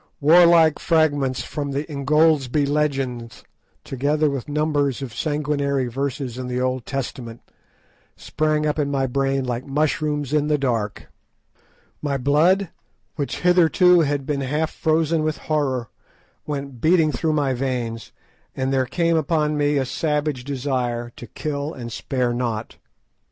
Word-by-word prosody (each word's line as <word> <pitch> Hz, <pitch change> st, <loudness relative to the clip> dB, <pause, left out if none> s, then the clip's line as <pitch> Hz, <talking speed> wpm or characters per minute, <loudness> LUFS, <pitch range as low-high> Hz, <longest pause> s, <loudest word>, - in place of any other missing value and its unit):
Warlike 165 Hz, 0 st, +6 dB
fragments 145 Hz, -6 st, +1 dB
from 145 Hz, -2 st, -4 dB
the 140 Hz, +2 st, -1 dB
"Ingoldsby 150 Hz, -1 st, +2 dB
Legends," 135 Hz, -5 st, -2 dB, 0.4 s
together 145 Hz, +3 st, 0 dB
with 135 Hz, 0 st, -5 dB
numbers 145 Hz, -3 st, 0 dB
of 125 Hz, -4 st, -7 dB
sanguinary 145 Hz, -2 st, -1 dB
verses 130 Hz, 0 st, -4 dB
in 130 Hz, -, -4 dB
the 125 Hz, 0 st, -2 dB
Old 130 Hz, -1 st, -2 dB
Testament, 120 Hz, -3 st, -5 dB, 0.8 s
sprang 155 Hz, 0 st, -1 dB
up 150 Hz, +1 st, 0 dB
in 145 Hz, -1 st, 0 dB
my 135 Hz, -1 st, 0 dB
brain 135 Hz, +1 st, 0 dB
like 120 Hz, 0 st, -3 dB
mushrooms 150 Hz, 0 st, -1 dB
in 150 Hz, -1 st, +2 dB
the 150 Hz, -1 st, +2 dB
dark; 115 Hz, -7 st, -2 dB, 0.9 s
my 140 Hz, -2 st, -1 dB
blood, 160 Hz, +8 st, +3 dB, 0.5 s
which 145 Hz, -3 st, -4 dB
hitherto 180 Hz, 0 st, +5 dB
had 145 Hz, -3 st, 0 dB
been 140 Hz, -1 st, -2 dB
half 150 Hz, +4 st, -1 dB
frozen 160 Hz, 0 st, +1 dB
with 155 Hz, 0 st, -1 dB
horror, 135 Hz, -6 st, -1 dB, 0.6 s
went 140 Hz, -4 st, -5 dB
beating 160 Hz, -2 st, +4 dB
through 155 Hz, +4 st, -1 dB
my 145 Hz, -3 st, +1 dB
veins, 120 Hz, -3 st, -3 dB, 0.4 s
and 130 Hz, 0 st, -1 dB
there 130 Hz, -1 st, +1 dB
came 170 Hz, +4 st, +1 dB
upon 155 Hz, -1 st, +1 dB
me 145 Hz, 0 st, +1 dB
a 135 Hz, -, +1 dB
savage 150 Hz, -2 st, -1 dB
desire 125 Hz, -3 st, -2 dB
to 120 Hz, -, -10 dB
kill 145 Hz, +5 st, -4 dB
and 120 Hz, -2 st, -7 dB
spare 125 Hz, -1 st, -1 dB
not. 120 Hz, -2 st, -3 dB
140 Hz, 140 wpm, -22 LUFS, 130-155 Hz, 0.9 s, Warlike